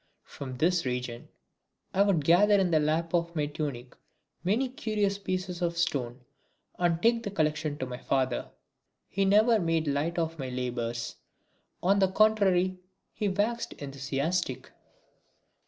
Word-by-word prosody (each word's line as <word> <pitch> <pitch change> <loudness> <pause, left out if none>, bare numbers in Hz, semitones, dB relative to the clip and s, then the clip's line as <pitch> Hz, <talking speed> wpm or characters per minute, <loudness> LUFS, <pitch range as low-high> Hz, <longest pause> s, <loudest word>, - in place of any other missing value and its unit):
From 130 -2 -8
this 170 +4 +2
region 125 -2 -4 0.7
I 195 - +3
would 190 -8 +3
gather 205 +6 +6
in 190 -3 +2
the 155 - +4
lap 160 +3 0
of 170 0 0
my 150 -2 +1
tunic 145 -4 -5 0.5
many 220 +9 +1
curious 210 -5 -1
pieces 185 -2 -3
of 170 -1 -1
stone 135 -7 -1 0.6
and 170 -2 +2
take 230 0 +4
the 220 - -4
collection 155 -4 -1
to 130 - -3
my 125 -1 -7
father. 130 -2 -1 0.6
He 195 +1 +1
never 215 +3 +5
made 165 -3 +1
light 150 +4 -1
of 165 -1 -2
my 130 -1 -4
labours. 120 -2 -3 0.7
On 195 +3 +4
the 190 - +5
contrary 190 -3 +3 0.3
he 210 - -1
waxed 215 +5 -1
enthusiastic. 140 +2 -3
170 Hz, 140 wpm, -29 LUFS, 140-195 Hz, 0.7 s, gather